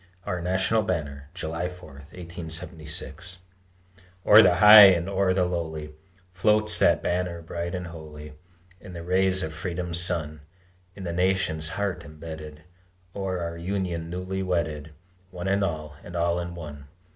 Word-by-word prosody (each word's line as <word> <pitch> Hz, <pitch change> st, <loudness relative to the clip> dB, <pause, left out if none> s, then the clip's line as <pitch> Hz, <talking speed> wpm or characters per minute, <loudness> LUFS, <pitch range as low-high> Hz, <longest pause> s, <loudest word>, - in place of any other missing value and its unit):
OUR 90 Hz, -1 st, -3 dB
NATIONAL 95 Hz, +5 st, +1 dB
BANNER 75 Hz, -7 st, -4 dB
[July 85 Hz, 0 st, -3 dB
4, 90 Hz, 0 st, -12 dB, 0.2 s
1876] 85 Hz, +1 st, -5 dB, 0.9 s
O'er 105 Hz, +2 st, +9 dB
the 90 Hz, -, +5 dB
high 105 Hz, +2 st, +11 dB
and 90 Hz, -2 st, +2 dB
o'er 100 Hz, -1 st, +1 dB
the 95 Hz, -1 st, +2 dB
lowly 80 Hz, -3 st, -4 dB, 0.4 s
Floats 105 Hz, +3 st, +2 dB
that -, -, +3 dB
banner 90 Hz, -1 st, -1 dB
bright 85 Hz, +2 st, -4 dB
and 90 Hz, -1 st, -4 dB
holy 75 Hz, -3 st, -10 dB, 0.5 s
In 95 Hz, -3 st, -11 dB
the 85 Hz, -1 st, -7 dB
rays 95 Hz, +1 st, +1 dB
of 80 Hz, 0 st, -4 dB
Freedom's 85 Hz, +1 st, -3 dB
sun, 80 Hz, -4 st, -1 dB, 0.5 s
In 100 Hz, -, -9 dB
the 85 Hz, -2 st, -3 dB
nation's 90 Hz, -3 st, 0 dB
heart 100 Hz, -3 st, -2 dB
embedded, 75 Hz, 0 st, -9 dB, 0.5 s
O'er 95 Hz, -2 st, -3 dB
our 85 Hz, 0 st, -4 dB
Union 90 Hz, -2 st, -3 dB
newly 90 Hz, +2 st, -4 dB
wedded, 80 Hz, -5 st, -2 dB, 0.4 s
One 90 Hz, 0 st, -6 dB
in 100 Hz, +1 st, +2 dB
all, 75 Hz, -5 st, -3 dB
and 90 Hz, -, -10 dB
all 85 Hz, 0 st, +1 dB
in 85 Hz, 0 st, -5 dB
one. 75 Hz, -4 st, -9 dB
85 Hz, 145 wpm, -26 LUFS, 80-95 Hz, 0.9 s, high